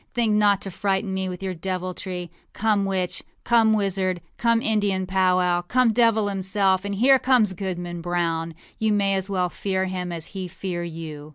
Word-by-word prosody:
Think 230 -3 +2
not 205 -2 +3
to 195 - -7
frighten 195 +1 -1
me 190 0 -2
with 180 +1 -7
your 190 -1 -2
deviltry. 185 0 -4 0.2
Come 210 -2 +1
witch, 190 -2 -2 0.2
come 225 -2 +4
wizard, 190 -3 0 0.2
come 230 -1 +2
Indian 205 -4 0
powwow, 185 -1 +2
come 235 +5 +2
devil 225 -2 +3
himself, 190 -1 +1
and 200 0 -3
here 260 +6 +5
comes 245 -7 +3
Goodman 175 -2 -5
Brown. 165 -1 -1 0.2
You 220 -1 +2
may 200 -1 +2
as 190 0 -1
well 180 -2 0
fear 190 +1 -2
him 180 -1 -4
as 165 -2 -5
he 190 -2 -4
fear 180 -1 -5
you. 160 -3 -7
190 Hz, 175 wpm, -24 LUFS, 180-205 Hz, 0.2 s, here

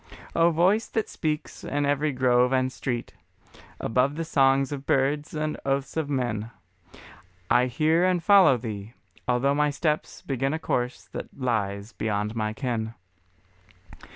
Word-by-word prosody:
O 170 0 +5
Voice 185 +7 +2
that 220 - -1
speaks 155 -2 -4
in 145 0 -1
every 145 +1 +1
grove 125 -1 +3
and 130 0 +1
street, 120 -2 -4 0.7
Above 125 +5 +1
the 165 +1 -3
song 135 -2 +3
of 140 -1 -7
birds 145 +3 +1
and 155 0 -2
oaths 135 0 -1
of 160 -3 -1
men, 120 -5 -1 1.0
I 125 +1 +5
hear 155 +7 +2
and 180 -2 +2
follow 190 -9 +6
Thee, 110 -2 -6 0.3
although 125 +3 +2
my 150 +1 +2
steps 150 +1 -2
Begin 135 +2 -1
a - - -1
course 125 -4 -2
that - - -5
lies 105 -4 -1
beyond 105 0 -2
my 110 -1 -1
ken. 115 -2 -3
135 Hz, 145 wpm, -26 LUFS, 120-150 Hz, 1.0 s, follow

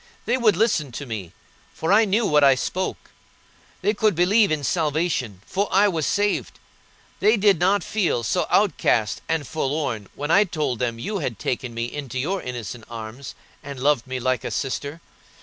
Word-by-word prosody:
They 240 - +2
would 220 -8 +3
listen 175 - +1
to 140 - -5
me, 105 -8 -6 0.4
for 160 +4 +1
I 220 +2 +6
knew 210 +3 +1
what 150 -4 +4
I 135 -1 +7
spoke; 185 +8 -4 0.7
they 210 - +2
could 215 -2 +2
believe 195 +4 +4
in 150 -2 -1
salvation, 150 - -1
for 200 - -1
I 200 +2 +5
was 160 -5 -1
saved; 205 0 0 0.6
they 220 +2 +4
did 200 -4 +4
not 195 +3 +2
feel 180 - 0
so 175 +9 0
outcast 115 - +2
and 160 -3 0
forlorn 135 - -2
when 145 +2 -3
I 205 - +6
told 150 - -2
them 120 -2 -1
you 200 - -3
had 125 - -3
taken 125 +1 -3
me 115 0 -1
into 130 0 -6
your 180 +9 -1
innocent 120 -2 -6
arms, 115 +3 -8 0.3
and 140 -2 -8
loved 135 -2 +2
me 130 0 -3
like 130 -1 0
a - - -3
sister. 140 +3 -3
150 Hz, 180 wpm, -23 LUFS, 125-195 Hz, 0.7 s, I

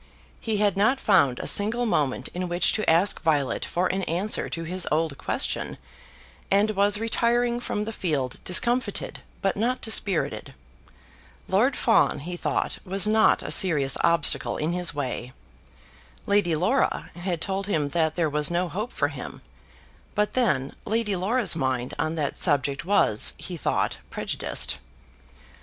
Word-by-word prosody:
He 220 -2 -1
had 205 -2 +2
not 225 +7 +3
found 155 - +3
a - - -5
single 225 +4 +1
moment 140 - 0
in 180 0 -4
which 175 +1 +2
to 215 - -1
ask 170 +5 +2
Violet 145 -4 0
for 175 +2 -1
an 190 +1 -1
answer 185 +6 -1
to 165 - -5
his 180 +2 -2
old 155 -1 0
question, - - -2 0.7
and 205 +2 +3
was 205 0 +3
retiring 235 +2 +1
from 210 -3 -3
the 225 - -4
field 145 -11 -2
discomfited, 235 +2 +1 0.2
but 195 - +1
not 245 +5 0
dispirited. 205 -5 -1 0.9
Lord - - +2
Fawn, - - +2
he 175 +4 -5
thought, - - -2
was 195 +2 +1
not 220 +1 +3
a - - -5
serious 145 -8 +3
obstacle 170 -3 +3
in 155 +3 -1
his 180 -1 0
way. 130 -3 -4 0.9
Lady 200 -5 +2
Laura 220 - 0
had 175 -1 -3
told 195 +2 -2
him 150 -8 0
that 160 -1 0
there 170 -2 +1
was 150 0 +1
no 175 +1 -1
hope 215 +8 -4
for - - 0
him; - - -9 0.7
but 210 0 0
then 145 - 0
Lady 220 -2 -1
Laura's 200 +2 +1
mind 130 -4 -2
on 155 +1 -1
that 150 -3 -3
subject 145 -1 +1
was, 180 - +3
he 180 - -7
thought, 165 - -1
prejudiced. - - +1
180 Hz, 150 wpm, -25 LUFS, 155-210 Hz, 0.9 s, not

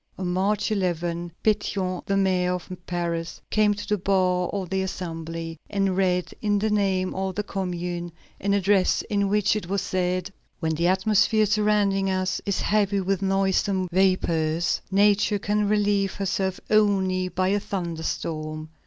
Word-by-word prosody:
On 185 - -4
March 195 +4 0
11, 175 -3 -1
Pétion, 195 -4 0
the 195 - +1
mayor 185 -2 +2
of 180 - -8 0.2
Paris, 170 -1 -3
came 210 -1 +3
to 205 - -7
the 210 -1 0
bar 180 -2 +1
of 190 -3 -4
the 190 0 +1
Assembly, 165 -3 -5
and 195 -2 0
read, 180 -2 +1
in 205 -1 +2
the 215 +1 0
name 190 -3 +1
of 190 0 -3
the 210 - -1
Commune, 175 -3 -4 0.3
an 200 +1 +1
address 195 -1 +2
in 200 -1 +1
which 210 0 +2
it 210 -5 -3
was 195 -1 0
said: 185 +1 -1 0.3
"When 160 -2 0
the 170 +2 +1
atmosphere 210 +3 +3
surrounding 205 -2 +2
us 185 0 -1
is 200 - 0
heavy 205 -1 +2
with 190 0 -1
noisome 195 -1 +1
vapors, 170 -3 +1
Nature 205 +1 +3
can 210 +1 0
relieve 205 -2 +1
herself 190 -1 -1
only 190 -3 +3
by 185 +1 0
a 205 +1 +2
thunder 170 -5 -4
storm. 155 -1 -4
190 Hz, 155 wpm, -25 LUFS, 180-200 Hz, 0.3 s, came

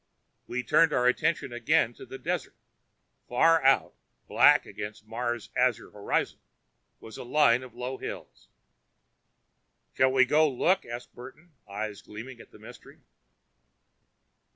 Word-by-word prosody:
We 125 +1 -3
turned 165 +5 +3
our 125 - +1
attention 125 +1 0
again 120 0 +1
to - - -13
the 135 - -8
desert. - - -4 0.7
Far 165 +6 +3
out, 135 +1 +3 0.3
black - - +5
against 105 +1 -8
Mars' 120 0 -4
azure 125 -2 0
horizon, 100 -1 -2 0.6
was 110 - -11
a - - -6
line 125 -2 +3
of 125 -3 -12
low 125 +2 -5
hills. - - -9 1.4
"Shall 130 0 +3
we 130 -1 +4
go 155 +4 +3
look?" 170 +7 0
asked 120 +1 -8
Burton, 140 +8 -13 0.2
eyes 105 0 -5
gleaming 120 +4 -10
at - - -17
the - - -17
mystery. - - -15
125 Hz, 130 wpm, -27 LUFS, 115-135 Hz, 1.4 s, black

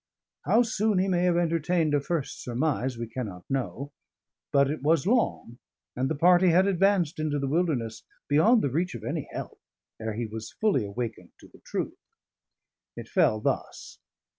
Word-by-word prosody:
How 235 - +4
soon 215 -2 0
he 185 +1 +2
may 180 -1 +1
have 175 -1 +3
entertained 165 -1 +1
a 145 - +2
first 155 -1 -3
surmise, 130 0 -1
we 115 - -3
cannot 110 -6 -6
know; 135 +1 -3 0.6
but 140 -1 +4
it 150 +1 -3
was 155 +1 +2
long, 210 - 0 0.4
and 130 +2 -1
the 160 - -1
party 180 +4 +5
had 180 +3 +4
advanced 190 -4 +2
into 155 -1 -1
the 140 -1 -2
Wilderness 135 -8 -1 0.3
beyond 215 +11 +4
the 140 - 0
reach 170 +2 -1
of 110 - -8
any 115 - -4
help, - - -7 0.4
ere 110 -1 -3
he 120 +1 -2
was 110 0 -7
fully 210 - +2
awakened 110 +2 -6
to - - -14
the - - -20
truth. - - -3 1.0
It - - -8
fell 110 - +3
thus. - - -3
150 Hz, 170 wpm, -27 LUFS, 125-180 Hz, 1.0 s, party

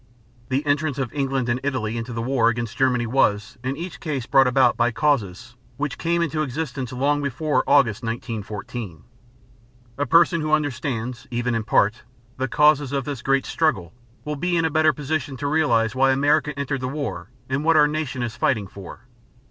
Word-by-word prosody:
The 135 +3 0
entrance 145 -1 0
of 135 -2 -3
England 135 -3 -1
and 120 +1 0
Italy 130 -5 -2
into 115 +1 -4
the 115 -1 -3
war 120 -2 +2
against 115 -1 -3
Germany 125 -2 +2
was 110 -2 +1
in 130 +2 -2
each 170 0 -7
case 140 -7 -3
brought 135 0 +4
about 125 -1 +4
by 120 0 +2
causes 120 -3 -1 0.2
which 145 -1 -3
came 170 0 +1
into 155 -1 -1
existence 135 -3 -4
long 140 +3 +1
before 145 +2 0
August, 130 -7 +3
1914. 110 - -5 1.0
A 145 - +1
person 170 0 +4
who 155 0 -1
understands, 125 -5 -2
even 120 0 -1
in 115 -1 -1
part, 105 +1 +2 0.4
the 130 +1 -1
causes 150 0 +3
of 140 -2 -1
this 140 -5 -5
great 135 0 +1
struggle, 100 - 0 0.3
will 150 0 -3
be 175 +4 0
in 165 - +2
a 160 - 0
better 155 0 +4
position 145 -2 -3
to 145 - -5
realize 140 -8 +2
why 135 +1 +3
America 145 +2 +2
entered 140 -1 -2
the 130 - -2
war 115 - -4 0.2
and 130 +2 -1
what 165 0 +4
our 150 -1 +6
nation 150 -4 -3
is 120 -1 -4
fighting 115 -4 +1
for. 95 -1 -11
135 Hz, 185 wpm, -23 LUFS, 120-150 Hz, 1.0 s, our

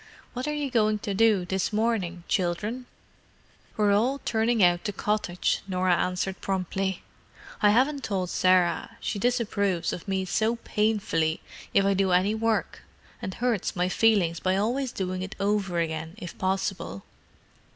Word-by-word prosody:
"What 250 +3 -4
are - - 0
you 290 -3 -2
going 215 -2 +2
to 205 - -1
do 210 -3 +3
this 190 0 -1
morning, 210 -6 -1
children?" 210 +8 -1 0.9
"We're 210 -1 +3
all 250 +7 +2
turning 225 -1 +2
out 175 0 +4
the 205 - 0
cottage," 205 -3 -1
Norah 185 -1 +2
answered 185 +2 -2
promptly. 190 0 -2 0.6
"I 210 - +6
haven't 265 +6 +2
told 185 -4 -2
Sarah; 185 +4 +2
she 205 - -3
disapproves 200 -7 0
of 175 - -7
me 190 -1 -1
so 220 +5 +1
painfully 210 -8 0 0.3
if 195 - +3
I 200 - +3
do 190 -1 +2
any 190 +4 +3
work, 225 0 -1 0.4
and 185 - -5
hurts 240 -5 -1
my 180 0 +1
feelings 185 -5 +3
by 185 0 +1
always 245 +5 0
doing 185 -1 -3
it 190 +2 -6
over 200 -3 0
again, 160 +1 -3
if 175 -6 -8
possible. 190 - -2
195 Hz, 150 wpm, -26 LUFS, 180-220 Hz, 0.9 s, I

